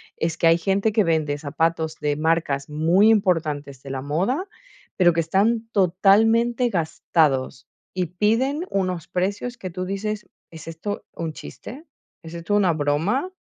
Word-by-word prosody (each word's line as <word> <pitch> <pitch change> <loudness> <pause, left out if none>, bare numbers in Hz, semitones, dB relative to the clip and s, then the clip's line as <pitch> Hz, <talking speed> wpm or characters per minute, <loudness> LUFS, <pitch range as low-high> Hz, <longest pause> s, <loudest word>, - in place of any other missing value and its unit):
es 165 0 -2
que 165 - +3
hay 165 +1 +5
gente 195 +4 +1
que 215 -1 +3
vende 155 -4 0
zapatos 160 +2 -1
de 145 -1 0
marcas 155 -3 0
muy 165 +8 +3
importantes 155 - 0
de 140 - -9
la 130 - -4
moda, 190 - -1 0.5
pero 175 -3 +5
que 165 - -1
están 210 +8 +1
totalmente 225 +6 +3
gastados 155 - 0 0.3
y 185 -1 -1
piden 230 - 0
unos 185 -4 -2
precios 200 +7 -2
que 190 -5 -6
tú 185 +1 -5
dices: 210 +2 -4 0.2
"¿Es 160 -1 -12
esto 165 +5 -5
un 165 -2 -5
chiste? 275 - -10 0.4
¿Es 165 0 -10
esto 170 +4 -2
una 195 -4 +3
broma?". 160 - 0
175 Hz, 150 wpm, -23 LUFS, 160-210 Hz, 0.5 s, hay